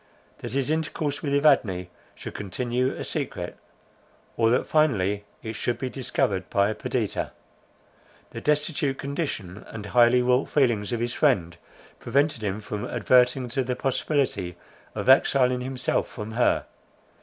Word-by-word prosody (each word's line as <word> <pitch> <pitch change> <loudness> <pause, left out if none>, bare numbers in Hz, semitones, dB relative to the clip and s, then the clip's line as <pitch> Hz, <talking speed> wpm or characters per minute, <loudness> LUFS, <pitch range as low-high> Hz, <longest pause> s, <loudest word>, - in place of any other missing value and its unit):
That 120 -1 -6
his 135 +1 0
intercourse 155 -2 -2
with 145 - -2
Evadne 120 - +3 0.3
should - - -8
continue 120 +6 -1
a - - -6
secret - - -3
to, - - -24 0.8
or 115 -1 +3
that 125 +3 +2
finally 105 -10 +1 0.2
it 110 - -4
should 120 +2 -2
be 130 -1 -4
discovered 105 -7 -1
by 100 +2 +2
Perdita. 110 0 -2 1.0
The 115 - -7
destitute 150 -1 0
condition, 135 - -4
and 105 -2 -8
highly 120 +3 +4
wrought 125 +2 +2
feelings 120 -8 +2
of 120 -1 -1
his 120 0 -1
friend 95 - +2 0.4
prevented 140 -3 +1
him 100 +1 -2
from 105 0 -5
adverting 125 +2 +3
to 135 +2 0
the 125 0 -2
possibility 125 - -1 0.4
of - - -4
exiling 130 -1 +4
himself 130 0 -1
from 105 -2 -7
her. 120 +2 +2
125 Hz, 145 wpm, -25 LUFS, 105-135 Hz, 1.0 s, highly